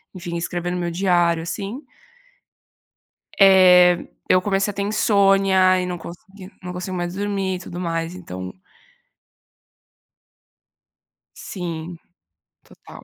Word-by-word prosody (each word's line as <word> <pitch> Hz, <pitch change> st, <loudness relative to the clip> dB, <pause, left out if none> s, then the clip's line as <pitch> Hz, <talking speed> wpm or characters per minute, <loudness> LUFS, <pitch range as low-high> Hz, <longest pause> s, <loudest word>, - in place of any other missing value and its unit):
enfim, 175 Hz, -1 st, -6 dB
escrevendo 175 Hz, +1 st, -3 dB
no -, -, -3 dB
meu 170 Hz, -, -2 dB
diário, 175 Hz, -2 st, +1 dB
assim 205 Hz, -, -5 dB, 1.6 s
eh, 180 Hz, -2 st, +6 dB, 0.2 s
eu 185 Hz, -, +4 dB
comecei 195 Hz, +1 st, 0 dB
a -, -, -9 dB
ter 200 Hz, -, -3 dB
insônia 195 Hz, -3 st, +3 dB
e 180 Hz, -, -3 dB
não 180 Hz, -1 st, -4 dB
consegui 190 Hz, +3 st, -12 dB
não 180 Hz, -, -6 dB
consigo 180 Hz, +1 st, -5 dB
mais 175 Hz, 0 st, -4 dB
dormir 195 Hz, -2 st, -2 dB
e -, -, -7 dB
tudo 175 Hz, 0 st, -8 dB
mais, 165 Hz, -1 st, -3 dB
então 95 Hz, -, -8 dB, 2.8 s
Sim, 170 Hz, -2 st, -7 dB, 0.7 s
total. -, -, -15 dB
180 Hz, 115 wpm, -21 LUFS, 175-195 Hz, 2.8 s, eh